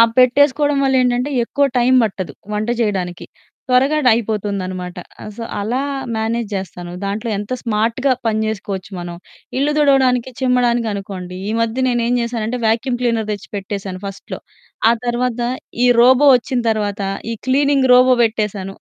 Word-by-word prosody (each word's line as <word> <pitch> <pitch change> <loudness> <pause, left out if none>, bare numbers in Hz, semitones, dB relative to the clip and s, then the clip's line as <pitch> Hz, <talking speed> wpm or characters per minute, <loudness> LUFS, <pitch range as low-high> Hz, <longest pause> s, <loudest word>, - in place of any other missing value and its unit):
ఆ - - +10
పెట్టేసుకోవడం 285 +3 +4
వల్లేంటంటే 255 0 +2
ఎక్కువ 280 +4 0
టైమ్ 255 +2 +4
పట్టదు 185 -7 -4 0.2
వంట 210 +2 -2
చేయడానికి. 185 -5 -2 0.4
త్వరగా 265 +4 +3
డ్ - - +6
అయిపోతుందనమాట. 200 -5 -2 0.3
ఆహ్, 210 - -7
సో, 230 - -6 0.2
అలా 240 +6 -1 0.4
మ్యానేజ్ 225 +1 -1
జేస్తాను. 175 -2 -6
దాంట్లో 210 +4 -3
ఎంత 205 - -6
స్మార్ట్‌గా 230 +4 +1
పని 220 -1 +1
చేసుకోవచ్చు 195 -3 -4
మనం. 175 0 -6 0.4
ఇల్లు 290 +2 +1
దుడవడానికి, 260 -3 +3
చిమ్మడానికనుకోండి, 220 -8 -1
ఈ - - -1
మధ్య 230 +3 0
నేనేం 240 0 +1
చేశానంటే 235 0 -3
వ్యాక్యూమ్ 235 +3 +1
క్లీనర్ 230 -3 0
తెచ్చి 205 -1 -7
పెట్టేసాను 195 -1 -5
ఫస్ట్‌లో. 195 0 -7 0.5
ఆ - - +5
తర్వాత 240 0 -1 0.5
ఈ - - +5
రోబో 260 +4 +6
వచ్చిన 250 +1 -3
తర్వాత 205 -2 -2 0.3
ఈ - - -2
క్లీనింగ్ 275 -1 +3
రోబో 255 0 +6
పెట్టేశాను. 210 -4 -2
230 Hz, 140 wpm, -18 LUFS, 200-255 Hz, 0.5 s, ఆ